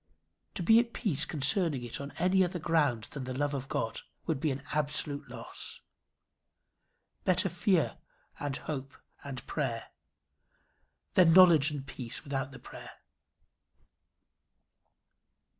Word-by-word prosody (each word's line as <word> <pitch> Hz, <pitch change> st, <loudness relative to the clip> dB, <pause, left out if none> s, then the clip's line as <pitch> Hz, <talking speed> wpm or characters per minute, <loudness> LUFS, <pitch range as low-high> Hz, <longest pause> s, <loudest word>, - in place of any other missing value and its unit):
To 180 Hz, -, -3 dB
be 225 Hz, +6 st, +7 dB
at 235 Hz, 0 st, -1 dB
peace 165 Hz, -, 0 dB
concerning 150 Hz, -1 st, +2 dB
it 120 Hz, +3 st, -5 dB
on 140 Hz, -, -5 dB
any 185 Hz, +2 st, +3 dB
other 180 Hz, 0 st, -2 dB
ground 150 Hz, -9 st, +1 dB
than 140 Hz, -3 st, -6 dB
the 130 Hz, 0 st, -4 dB
love 145 Hz, 0 st, 0 dB
of 135 Hz, -1 st, -4 dB
God, 115 Hz, -, -2 dB, 0.2 s
would 160 Hz, -5 st, -1 dB
be 155 Hz, -, 0 dB
an 135 Hz, 0 st, -3 dB
absolute 145 Hz, -1 st, -1 dB
loss. 125 Hz, -, -8 dB, 1.4 s
Better 185 Hz, +1 st, +2 dB
fear 180 Hz, -1 st, +1 dB, 0.4 s
and 145 Hz, -2 st, -2 dB
hope 135 Hz, -3 st, -6 dB, 0.3 s
and 135 Hz, -2 st, -7 dB
prayer, 125 Hz, -7 st, -3 dB, 1.2 s
than 170 Hz, -3 st, +6 dB
knowledge 170 Hz, -5 st, +7 dB
and 145 Hz, -3 st, -5 dB
peace 125 Hz, -3 st, -6 dB
without 135 Hz, -2 st, -3 dB
the 135 Hz, -, -10 dB
prayer. -, -, -11 dB
145 Hz, 125 wpm, -31 LUFS, 135-170 Hz, 1.4 s, be